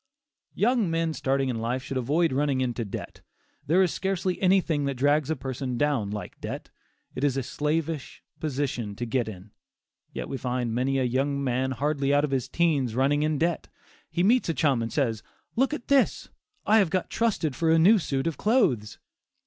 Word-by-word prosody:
Young 230 -3 +2
men 165 -1 0
starting 135 -2 0
in 120 -3 -2
life 120 +3 -2
should 135 - -5
avoid 145 +5 +1
running 140 -1 +1
into 120 -2 -1
debt. 100 - -7 0.5
There 180 +6 +4
is 180 - 0
scarcely 190 -1 -2
anything 180 -6 +2
that 140 -1 -1
drags 145 +2 +2
a 160 - +1
person 130 -1 -4
down 140 -8 +1
like 105 0 -7
debt. - - -6 0.4
It 130 - -5
is 140 -2 +2
a 135 - -1
slavish 150 +2 -3 0.2
position 130 -8 -2
to 120 - -4
get 120 0 -1
in, 100 -1 -9 0.6
yet - - -5
we 135 - -4
find 125 -2 -2
many 130 +3 0
a 130 - +1
young 140 +3 0
man 130 0 0
hardly 140 +2 0
out 145 0 +3
of 150 - -1
his 130 -3 -1
"teens" 145 -9 +1
running 140 +3 +2
in 155 0 +1
debt. 170 +3 0 0.4
He 175 - 0
meets 235 0 +3
a 165 - 0
chum 135 -4 +2
and 115 - -3
says, 115 -7 0 0.3
"Look 265 +4 +2
at 300 -5 -5
this; 280 -2 +2 0.4
I 220 +1 +5
have 195 -5 +3
got 185 +1 -2
trusted 195 - 0
for 165 -1 +1
a 165 - +5
new 200 +7 +6
suit 135 -4 -2
of 165 -2 -2
clothes." 145 - +1
140 Hz, 195 wpm, -26 LUFS, 130-165 Hz, 0.6 s, new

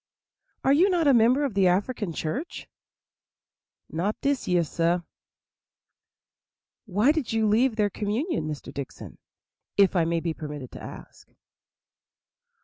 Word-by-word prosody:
are 270 - +4
you 350 +7 +5
not 350 -4 +1
a 280 - +6
member 245 +5 +4
of 265 - -3
the 195 -1 +3
African 200 +2 0
church?" 235 - -4 1.2
"Not 185 +7 -2
dis 280 -2 -1
year, 180 -1 +3
sah." 170 +2 0 1.9
"Why 210 +8 +3
did 305 -8 -2
you 225 -1 +2
leave 225 +3 +3
their 210 -2 +1
communion, 210 - -2
Mr. 150 -2 -6
Dickson, 140 -2 -8 0.6
if 200 -1 +4
I 170 -2 +3
may 165 0 0
be 165 0 -2
permitted 150 -5 -7
to - - -10
ask?" - - -11
205 Hz, 135 wpm, -26 LUFS, 170-260 Hz, 1.9 s, a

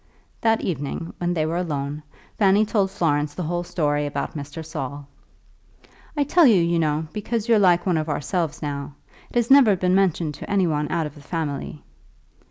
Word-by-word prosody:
That 225 -1 +2
evening, 160 0 -4
when 175 0 -1
they 155 -2 +1
were 165 +2 -1
alone, 145 -4 -3 0.4
Fanny 200 +1 +4
told 205 -3 +1
Florence 150 -6 0
the 180 - -3
whole 175 +2 -2
story 145 -4 0
about 140 +1 -4
Mr. 145 +2 -7
Saul. 140 -2 -6 1.1
"I 290 - +3
tell 320 +2 +5
you, 215 -6 +5
you 170 0 +1
know, 155 0 0
because 220 +1 -3
you're 230 -2 +5
like 175 -3 +4
one 180 -4 +2
of 155 0 -2
ourselves 160 +2 -2
now. 140 -1 -4 0.3
It - - -18
has 240 +1 +1
never 260 -7 +7
been 180 0 +1
mentioned 175 -5 +1
to - - -7
any 200 -2 +2
one 150 -2 -1
out 165 -2 0
of 150 - -7
the 145 - -14
family." 145 -1 -4
165 Hz, 185 wpm, -23 LUFS, 150-195 Hz, 1.1 s, never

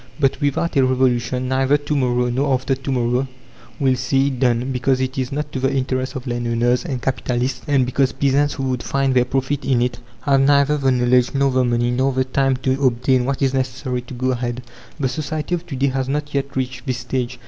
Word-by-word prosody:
But 135 -3 +1
without 145 +4 0
a 135 - +5
revolution, 130 -1 +1
neither 135 +2 +2
to 145 +1 -3
morrow, 125 -2 +1
nor 135 +2 +1
after 135 +2 -1
to 135 +1 -4
morrow 125 +1 0 0.5
will 135 -2 +3
see 135 +2 +1
it 130 -3 -5
done, 125 +1 +1
because 130 +1 +1
it 130 0 -2
is 130 -1 -2
not 145 +1 -3
to 130 - -3
the 135 +1 +1
interest 130 -1 -1
of 130 0 -5
landowners 120 0 0
and 130 -3 -3
capitalists; 125 0 -2
and 140 -3 +3
because 130 +1 +1
peasants 140 +1 +1
who 135 - -4
would 130 -2 -1
find 135 -1 0
their 125 -1 +3
profit 135 +3 -1
in 130 -3 +2
it 125 0 -1 0.2
have 135 -2 +3
neither 140 +1 +3
the 135 -1 +2
knowledge 125 0 +2
nor 140 0 +2
the 130 0 +2
money, 120 0 +1
nor 130 +2 +1
the 130 0 +1
time 135 0 +1
to 135 +1 0
obtain 125 0 +2
what 140 +1 -1
is 135 -1 +2
necessary 130 -1 -2
to 125 +1 -10
go 130 +1 0
ahead. 120 0 -3 0.4
The 135 - +1
society 155 +4 -3
of 175 0 -2
to 145 - -5
day 135 +1 +1
has 135 0 -2
not 145 +1 -2
yet 140 0 -2
reached 130 +1 -3
this 130 -1 -1
stage. 125 0 -3
130 Hz, 225 wpm, -20 LUFS, 125-135 Hz, 0.5 s, a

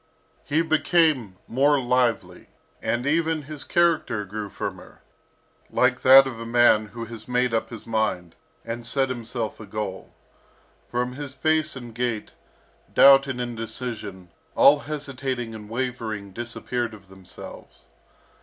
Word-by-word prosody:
He 155 +3 +1
became 155 - +2
more 140 +4 +3
lively, 125 -2 0 0.3
and 120 +2 -1
even 160 +1 +1
his 150 0 -5
character 170 - +1
grew 105 +1 -6
firmer, - - -7 0.7
like 125 0 +2
that 135 +1 +9
of 125 -4 -6
a 115 - -6
man 115 -2 +4
who 115 +2 -7
has 115 -1 -10
made 125 -1 +1
up 115 - 0
his 115 -3 -9
mind, 110 -7 -1 0.3
and 115 +1 -5
set 135 +3 +1
himself 120 -2 -4
a 110 - -10
goal. 105 -1 -5 0.8
From 125 +1 -2
his 140 0 -7
face 155 +1 +1
and 120 -3 -9
gait, 120 - -3 0.6
doubt 135 0 +7
and 130 -2 -4
indecision, 115 -5 -5 0.3
all 145 +1 +7
hesitating 135 -5 -4
and 105 -1 -10
wavering 115 -5 -4
disappeared 120 0 -3
of 100 -2 -17
themselves. 90 -9 -12
120 Hz, 135 wpm, -24 LUFS, 110-135 Hz, 0.8 s, that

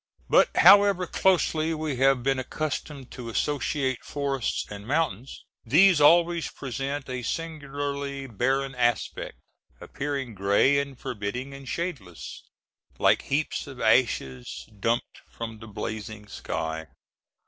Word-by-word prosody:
But - - +6
however 200 0 +7
closely 165 -3 +2
we 155 -4 -3
have 135 -1 +3
been 135 0 +1
accustomed 140 0 -4
to 120 -2 -7
associate 135 +1 -1
forests 140 -3 -2
and 105 0 -9
mountains, 135 -5 -2 0.2
these 160 - +5
always 170 +2 +5
present 135 +2 -4
a 130 -1 -4
singularly 140 -2 -4
barren 135 +3 0
aspect, 120 -1 -1 0.4
appearing 140 -4 -4
gray 100 +8 +3
and 140 -2 -4
forbidding 125 +5 -4
and 135 -1 -10
shadeless, 130 - -5 0.6
like - - +4
heaps 150 +1 -1
of 135 -3 -10
ashes 110 - +1
dumped 115 +4 -1
from 115 -1 -7
the 110 - -10
blazing 110 0 -6
sky. 80 -5 -4
135 Hz, 115 wpm, -26 LUFS, 115-145 Hz, 0.6 s, however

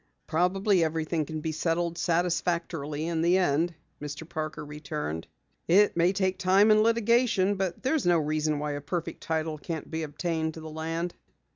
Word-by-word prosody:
"Probably 185 +3 +2
everything 160 0 -1
can 155 -1 -4
be 160 - -2
settled 170 +2 -1
satisfactorily 170 -3 -1
in 165 -1 -1
the 175 +2 +4
end," 170 -1 +1 0.3
Mr. 150 +2 -6
Parker 155 -2 -4
returned. 150 - -5 0.4
"It 200 +5 +5
may 170 +2 +4
take 190 -1 0
time 195 +3 +5
and 215 0 +6
litigation, 230 -3 +3
but 190 -3 -3
there's 265 - +1
no 175 -1 +5
reason 155 0 0
why 150 0 -2
a 145 0 -4
perfect 165 +3 -4
title 160 -1 -2
can't 160 +1 -5
be 160 0 -2
obtained 160 +1 -2
to - - -7
the 160 0 -8
land." 165 +2 -3
165 Hz, 165 wpm, -28 LUFS, 155-185 Hz, 0.4 s, and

